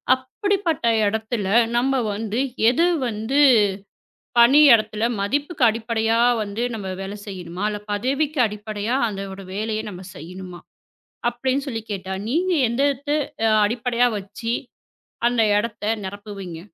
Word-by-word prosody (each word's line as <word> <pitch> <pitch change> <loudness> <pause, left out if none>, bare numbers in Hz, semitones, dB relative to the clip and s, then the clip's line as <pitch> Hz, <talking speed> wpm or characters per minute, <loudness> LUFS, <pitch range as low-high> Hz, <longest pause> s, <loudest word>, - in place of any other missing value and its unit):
அப்படிப்பட்ட 330 - -1 0.2
இடத்துல 220 -1 -2 0.3
நம்ம 265 +1 +2
வந்து 220 +3 -3 0.3
எது 295 +8 +3 0.2
வந்து 225 +5 -1 1.0
பணியிடத்துல 235 -4 +6 0.2
மதிப்புக்கு 285 - -1
அடிப்படையா 225 0 0 0.2
வந்து 205 +3 -4
நம்ம 200 -3 -6
வேலை 195 +2 -6
செய்யணுமா? 180 -1 -6
இல்ல 210 - -4
பதவிக்கு 275 +7 -1
அடிப்படையா 210 +3 -3 0.3
அந்த 195 +1 -9
வேலையை 215 +1 -2
நாம 180 -1 -9
செய்யணுமா 180 +3 -9 0.7
அப்டின்னு 260 +3 -2
சொல்லி 225 -4 -3
கேட்டா, 190 -1 -4 0.2
நீங்க 355 +7 +1 0.2
எந்ததா 280 +3 0 0.5
அடிப்படையா 245 +2 +1
வச்சு 230 +4 -5 0.7
அந்த 240 -1 +2 0.2
இடத்தை 210 0 -2 0.2
நிரப்புவீங்க? 195 -3 -7
225 Hz, 110 wpm, -22 LUFS, 205-260 Hz, 1.0 s, பணியிடத்துல